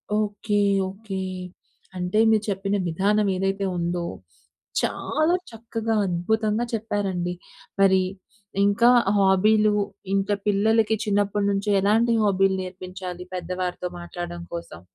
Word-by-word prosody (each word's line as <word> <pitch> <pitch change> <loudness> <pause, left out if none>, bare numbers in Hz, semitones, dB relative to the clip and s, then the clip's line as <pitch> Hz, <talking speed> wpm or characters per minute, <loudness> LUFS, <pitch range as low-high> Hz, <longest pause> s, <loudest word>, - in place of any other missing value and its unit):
Okay. 210 0 0 0.3
Okay. 195 0 -6 0.8
అంటే 180 +4 0
మీరు 220 -1 +3
చెప్పిన 195 +1 -1
విధానం 200 +5 +1
ఏదైతే 195 +1 -1
ఉందో 175 0 -1 0.8
చాలా 310 +3 0 0.2
చక్కగా 225 0 -3
అద్భుతంగా 215 +5 0
చెప్పారండి. 195 -5 -2 0.5
మరి 190 -1 +5 0.6
ఇంకా 205 +4 +5 0.3
హాబీలు 210 +2 +4 0.4
ఇంకా 195 +1 +1
పిల్లలకి 220 +2 +3
చిన్నప్పటినుంచి 200 0 +1
ఎలాంటి 225 +4 +3
హాబీ‌లు 195 -2 +3
నేర్పించాలి? 185 -1 -7
పెద్దవారితో 180 0 -3
మాట్లాడడం 175 0 -6
కోసం. 170 - -7
200 Hz, 95 wpm, -24 LUFS, 185-215 Hz, 0.8 s, మరి